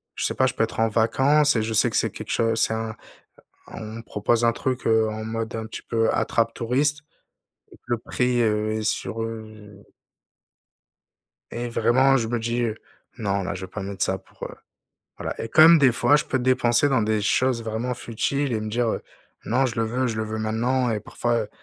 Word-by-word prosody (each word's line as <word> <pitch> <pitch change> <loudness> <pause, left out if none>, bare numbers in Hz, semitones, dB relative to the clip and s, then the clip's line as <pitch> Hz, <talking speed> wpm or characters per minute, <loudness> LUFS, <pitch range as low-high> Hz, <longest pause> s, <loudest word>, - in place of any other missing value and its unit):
je - - -3
sais - - -1
pas, 130 - +2
je 125 - -2
peux - - 0
être 110 - -3
en 115 - +4
vacances 135 +7 +3
et - - +2
je 110 +1 -2
sais 110 - +4
que - - -5
c'est - - +1
quelque - - -8
chose 115 -1 +1
c'est - - +2
un 110 -1 -4 0.8
on - - -8 0.2
me 115 - -7
propose 115 +2 0
un 115 - +4
truc, 130 +2 -3
heu, 110 -1 +3
en 110 0 -5
mode 115 +1 -4
un 110 -1 -4
petit 110 - -8
peu 115 -1 +1
attrape 115 0 0
touristes 140 +5 0 0.7
et - - -15
que - - -57
le 120 -1 -1
prix, 125 +1 0
heu, 110 -1 +1
est 110 0 -2
sur 115 +1 -2
heu 110 -3 -9 1.7
Et 120 +1 -4
vraiment 130 +3 +3
je 115 -3 -1
me 120 +1 -1
dis, 120 +2 -1
heu: 115 -2 -1 0.4
«Non 100 -4 -1
là, 90 - -3
je 95 - -7
vais 95 - -18
pas 105 - -5
mettre 100 0 -3
ça 95 - 0
pour, - - -16
heu» - - -6 0.6
voilà, - - -5
et 115 - -4
comme 160 +6 +8
des 135 -4 +5
fois 145 +5 +4
je 150 - 0
peux 130 - -1
dépenser 125 +1 +3
dans 130 -5 +2
des 110 0 +1
choses 120 +3 +1
vraiment 115 +3 -3
futiles 130 +4 -2
et 110 - -1
me 110 - -4
dire, 120 +2 0
heu: - - -2 0.4
«Non 130 +4 +2
je 120 - -5
le - - +2
veux, 125 +3 -1
je 110 - -3
le 110 - -1
veux 110 0 -4
maintenant» 120 +4 0
et 110 - 0
parfois, 120 +2 -1
heu, - - -12
115 Hz, 225 wpm, -24 LUFS, 110-125 Hz, 1.7 s, comme